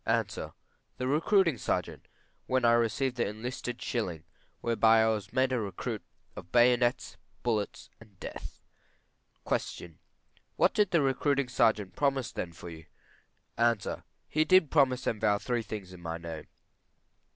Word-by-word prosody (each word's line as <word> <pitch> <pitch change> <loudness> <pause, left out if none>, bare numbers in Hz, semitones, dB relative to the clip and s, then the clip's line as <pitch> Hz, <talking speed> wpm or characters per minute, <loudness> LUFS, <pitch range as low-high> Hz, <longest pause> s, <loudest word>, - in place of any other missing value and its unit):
A. - - +2 0.7
The 125 - -2
recruiting 165 - +3
sergeant, - - -2 0.4
when 130 -1 +2
I 115 - +6
received 120 +2 +1
the 120 - +1
enlisting 120 +3 -5
shilling, 95 -10 -3 0.4
whereby 115 -1 +4
I 110 - +3
was 105 -2 -2
made 130 +1 +2
a 125 - +1
recruit 100 -4 -4 0.3
of 90 - -10
bayonets, 120 0 +3 0.3
bullets, 110 -4 -2
and 105 -4 -18
death. - - -8 0.8
Q. 85 -2 -3 0.6
What - - +3
did 210 -3 +3
the 170 -5 +3
recruiting 135 0 +1
sergeant 105 -6 +2
promise 135 -4 0
then 85 - -4
for 85 +1 -10
you? 80 -1 -11 0.7
A. 115 -3 +1 0.3
He 155 - +2
did 165 -1 +4
promise 135 -4 +3
and 110 - -1
vow 105 -2 +3
three 120 +3 -1
things 105 -4 -7
in 90 - -12
my 85 -1 -4
name. 85 -2 -7
120 Hz, 145 wpm, -30 LUFS, 105-130 Hz, 0.8 s, I